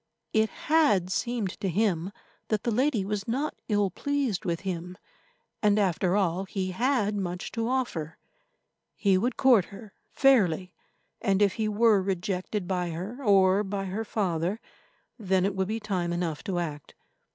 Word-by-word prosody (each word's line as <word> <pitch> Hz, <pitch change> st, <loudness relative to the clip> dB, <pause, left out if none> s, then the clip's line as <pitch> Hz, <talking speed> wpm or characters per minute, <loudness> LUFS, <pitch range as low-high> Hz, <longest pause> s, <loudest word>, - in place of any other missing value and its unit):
It 220 Hz, 0 st, +3 dB
had 210 Hz, -, +2 dB
seemed 225 Hz, -2 st, -2 dB
to 195 Hz, -, -1 dB
him 185 Hz, -1 st, 0 dB, 0.4 s
that 215 Hz, -2 st, -1 dB
the 235 Hz, -, 0 dB
lady 245 Hz, -3 st, +1 dB
was 200 Hz, 0 st, -3 dB
not 270 Hz, +6 st, -1 dB, 0.2 s
ill 205 Hz, -3 st, +2 dB
pleased 275 Hz, -5 st, -1 dB
with 170 Hz, -2 st, -1 dB
him, 180 Hz, -1 st, -5 dB, 0.6 s
and, 210 Hz, -1 st, +3 dB
after 185 Hz, -2 st, +1 dB
all, 190 Hz, -1 st, 0 dB
he 190 Hz, -1 st, -3 dB
had 235 Hz, 0 st, +1 dB
much 180 Hz, -2 st, -4 dB
to 230 Hz, -1 st, -2 dB
offer. 235 Hz, -12 st, -2 dB, 0.8 s
He 195 Hz, -3 st, +2 dB
would 235 Hz, +7 st, 0 dB
court 245 Hz, -9 st, +5 dB
her 205 Hz, 0 st, -12 dB, 0.2 s
fairly, 190 Hz, -, +3 dB, 0.5 s
and 195 Hz, -1 st, +2 dB
if 200 Hz, -2 st, +3 dB
he 220 Hz, -2 st, -1 dB
were 215 Hz, -1 st, +4 dB
rejected 185 Hz, +1 st, -2 dB
by 180 Hz, -2 st, -1 dB
her, 195 Hz, +11 st, -6 dB
or 195 Hz, -2 st, +4 dB
by 195 Hz, 0 st, -3 dB
her 195 Hz, +4 st, -3 dB
father, 190 Hz, -2 st, -1 dB, 0.6 s
then 190 Hz, -3 st, +1 dB
it 200 Hz, 0 st, -1 dB
would 190 Hz, -1 st, 0 dB
be 220 Hz, +2 st, -2 dB
time 185 Hz, -5 st, -2 dB
enough 170 Hz, -3 st, -2 dB
to 190 Hz, -3 st, -2 dB
act. 150 Hz, -5 st, -5 dB
195 Hz, 160 wpm, -27 LUFS, 180-220 Hz, 0.8 s, court